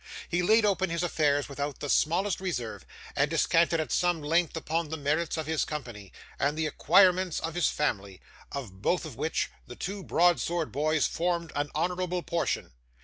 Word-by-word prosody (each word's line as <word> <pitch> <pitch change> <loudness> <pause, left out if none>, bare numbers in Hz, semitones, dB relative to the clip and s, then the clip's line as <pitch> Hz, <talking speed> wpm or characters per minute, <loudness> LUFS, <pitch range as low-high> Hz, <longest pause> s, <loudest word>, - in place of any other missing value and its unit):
He 175 +1 0
laid 215 +5 +4
open 190 -3 +1
his 170 +1 -1
affairs 145 -4 +1
without 140 0 -4
the 145 - -4
smallest 175 +7 +2
reserve, 125 -12 -4 0.3
and - - +2
descanted 165 0 +2
at 155 -6 -3
some 175 -2 +2
length 165 +2 +1
upon 160 0 -2
the 160 - -3
merits 155 +4 0
of 160 - -2
his 160 0 0
company, 120 - -6 0.3
and 145 +2 +1
the 160 - 0
acquirements 185 +2 +4
of 165 - -4
his 175 -2 +2
family; 100 -10 -2 0.3
of 105 -9 -7
both 175 - +1
of 150 -7 -8
which, 155 +6 -1 0.2
the 120 - -9
two 195 +6 -5
broad 175 0 +3
sword 170 -2 -2
boys 155 +2 +1
formed 170 -2 -1
an 145 0 -1
honourable 180 +2 -1
portion. 170 -1 -2
160 Hz, 180 wpm, -28 LUFS, 145-175 Hz, 0.3 s, laid